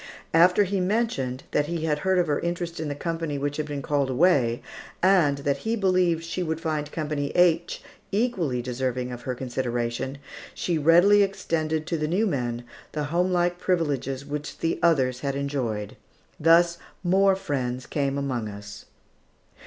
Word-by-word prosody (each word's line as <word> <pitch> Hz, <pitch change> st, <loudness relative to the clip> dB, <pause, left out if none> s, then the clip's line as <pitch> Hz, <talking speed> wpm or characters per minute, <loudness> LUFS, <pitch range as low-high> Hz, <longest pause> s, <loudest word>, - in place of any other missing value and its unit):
After 180 Hz, +5 st, +6 dB
he 195 Hz, 0 st, -1 dB
mentioned 180 Hz, -, -1 dB
that 145 Hz, 0 st, +1 dB
he 165 Hz, -1 st, -2 dB
had 150 Hz, -2 st, 0 dB
heard 190 Hz, +2 st, +1 dB
of 180 Hz, -, +3 dB
her 145 Hz, -3 st, 0 dB
interest 170 Hz, -1 st, -3 dB
in 160 Hz, -, -3 dB
the 145 Hz, -, -3 dB
company 165 Hz, -1 st, -3 dB
which 145 Hz, +1 st, -2 dB
had 155 Hz, -1 st, -2 dB
been 145 Hz, -2 st, -4 dB
called 140 Hz, -1 st, 0 dB
away, 130 Hz, -5 st, +2 dB, 0.4 s
and 180 Hz, -7 st, +4 dB
that 140 Hz, -1 st, +1 dB
he 220 Hz, +10 st, -2 dB
believed 185 Hz, -5 st, +2 dB
she 165 Hz, +2 st, -4 dB
would 160 Hz, -2 st, -2 dB
find 155 Hz, -3 st, -2 dB
Company 150 Hz, -3 st, -2 dB
H 170 Hz, -1 st, +2 dB, 0.3 s
equally 190 Hz, -, 0 dB
deserving 125 Hz, 0 st, -2 dB
of 120 Hz, -1 st, -7 dB
her 125 Hz, 0 st, -3 dB
consideration, 125 Hz, +1 st, -3 dB, 0.4 s
she 170 Hz, -3 st, -1 dB
readily 175 Hz, +7 st, +6 dB
extended 160 Hz, -5 st, -1 dB
to 165 Hz, -1 st, -2 dB
the 150 Hz, -, 0 dB
new 190 Hz, +8 st, +1 dB
men 120 Hz, -, -2 dB, 0.3 s
the 150 Hz, -, -2 dB
homelike 175 Hz, 0 st, +1 dB
privileges 140 Hz, -7 st, -1 dB
which 145 Hz, +1 st, -5 dB
the 165 Hz, -, -1 dB
others 130 Hz, -7 st, +2 dB
had 140 Hz, 0 st, -2 dB
enjoyed. 130 Hz, -7 st, -3 dB, 0.4 s
Thus 170 Hz, +2 st, +4 dB, 0.2 s
more 190 Hz, +2 st, +4 dB
friends 130 Hz, -8 st, -3 dB
came 140 Hz, -2 st, -1 dB
among 125 Hz, -6 st, -2 dB
us. 105 Hz, 0 st, -10 dB
155 Hz, 160 wpm, -25 LUFS, 135-175 Hz, 0.4 s, After